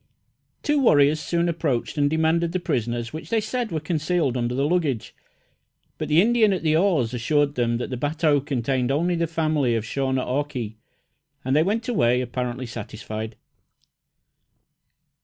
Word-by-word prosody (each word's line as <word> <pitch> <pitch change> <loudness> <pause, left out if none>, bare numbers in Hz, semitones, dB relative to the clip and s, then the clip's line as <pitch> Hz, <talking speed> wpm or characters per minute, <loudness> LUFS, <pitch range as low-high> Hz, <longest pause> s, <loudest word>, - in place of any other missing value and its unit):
Two 295 -1 +2
warriors 150 - +4
soon 170 +2 0
approached 155 -8 -1
and 145 -1 +2
demanded 160 +2 +1
the 185 - 0
prisoners 120 -6 -2
which 155 - -7
they 230 - +2
said 230 +1 -3
were 160 - -1
concealed 155 -3 0
under 120 0 -1
the 135 +2 +1
luggage, 155 -9 -1 0.9
but 155 - -2
the 150 +2 +4
Indian 220 +1 +4
at 185 - -3
the 155 -1 +3
oars 160 - +2
assured 145 +4 +1
them 120 -3 0
that 125 - -5
the 125 - -2
bateau 145 +2 +1
contained 130 -2 -1
only 165 +6 +1
the 170 -1 0
family 155 -6 +1
of 115 -1 -2
Shaw 135 +3 -2
ne 130 0 +1
aw 130 +3 0
kee, 120 -7 -6 0.7
and 130 +1 +1
they 155 - +5
went 215 +7 0
away 125 - +2
apparently 125 0 -3
satisfied. 110 -1 -6
145 Hz, 165 wpm, -24 LUFS, 125-170 Hz, 0.9 s, they